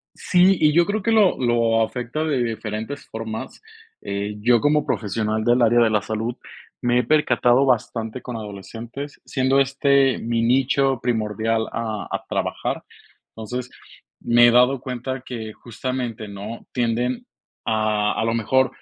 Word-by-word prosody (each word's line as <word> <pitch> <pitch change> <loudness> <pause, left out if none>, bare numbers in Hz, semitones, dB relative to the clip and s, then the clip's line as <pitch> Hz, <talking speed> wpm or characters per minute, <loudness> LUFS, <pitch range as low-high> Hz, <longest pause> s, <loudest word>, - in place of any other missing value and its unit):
Sí, 185 +1 +4
y 150 -1 +4
yo 170 +2 +5
creo 210 +3 -1
que 230 - 0
lo 215 -4 +4
lo 115 -2 +2
afecta 125 +6 -3
de 145 -6 0
diferentes 110 +3 -5
formas. 110 0 -6 0.4
Eh, 100 +1 -4
yo, 120 +1 +4
como 150 0 +2
profesional 110 +1 -1
del 120 +2 +3
área 120 +1 +4
de 115 -1 +4
la 105 -1 +1
salud, 110 +3 -3 0.5
me 120 0 +2
he - - +1
percatado 135 -2 +3
bastante 120 -1 -1
con 125 - -7
adolescentes, 115 +6 -8
siendo 130 0 +1
este 140 -1 +3
mi 115 0 -1
nicho 135 +2 +2
primordial 110 -1 0
a 110 -5 -4
a - - -3
trabajar. - - -2 0.5
Entonces, 125 +3 -5 0.5
me 120 0 +5
he - - +5
dado 125 +2 +4
cuenta 130 +1 -4
que 110 -3 -6
justamente, 120 -2 -5
¿no?, 100 +3 -8
tienden 120 +1 -1 0.4
a 110 -1 +1
a - - -1
lo 115 0 0
mejor, 130 +4 +2
120 Hz, 150 wpm, -22 LUFS, 110-130 Hz, 0.5 s, yo